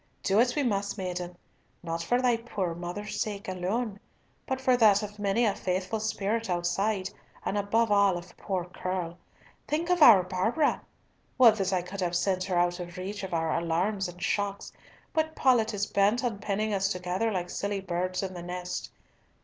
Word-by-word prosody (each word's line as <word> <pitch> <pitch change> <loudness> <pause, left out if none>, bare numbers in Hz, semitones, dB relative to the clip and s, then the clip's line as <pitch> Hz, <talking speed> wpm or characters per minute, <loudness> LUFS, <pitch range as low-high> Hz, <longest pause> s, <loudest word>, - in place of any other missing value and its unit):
Do 200 +2 +3
it 245 +1 +3
we 295 - +1
must, 200 -4 -1
maiden, 180 -2 -4 0.5
not 165 0 -3
for 245 +9 +1
thy 245 -2 +4
poor 205 -7 -3
mother's 175 +5 -5
sake 205 -2 -3
alone, 195 +4 -2 0.5
but 260 0 -1
for 260 -1 +3
that 215 -3 +5
of 210 0 -7
many 205 +4 +2
a 205 - +2
faithful 185 +4 -2
spirit 220 0 -1
outside, 185 +3 0 0.3
and - - -1
above 210 +2 +1
all 200 -3 +4
of 175 +1 -11
poor 185 -4 -3
Curll. 180 -1 -4 0.5
Think 335 +4 0
of 355 -2 +2
our 215 -10 +9
Barbara! 195 - +1 0.6
Would 235 -4 +7
that 195 -2 0
I 185 -2 +1
could 190 +2 -6
have 175 -1 0
sent 185 +1 +1
her 185 -2 -1
out 175 +1 +2
of 175 0 -7
reach 200 +3 -5
of 190 - -5
our 165 -1 0
alarms 180 +4 0
and 175 0 -10
shocks, 200 +1 -2 0.4
but 315 -1 0
Paulett 235 -4 +3
is 205 -1 -1
bent 210 +5 +2
on 225 -5 -1
penning 210 +2 -1
us 195 -1 +1
together 180 +4 -1
like 180 -3 -3
silly 200 0 -2
birds 185 0 -2
in 190 -1 -4
the 175 - -7
net. 180 +1 -5
195 Hz, 185 wpm, -28 LUFS, 180-220 Hz, 0.6 s, our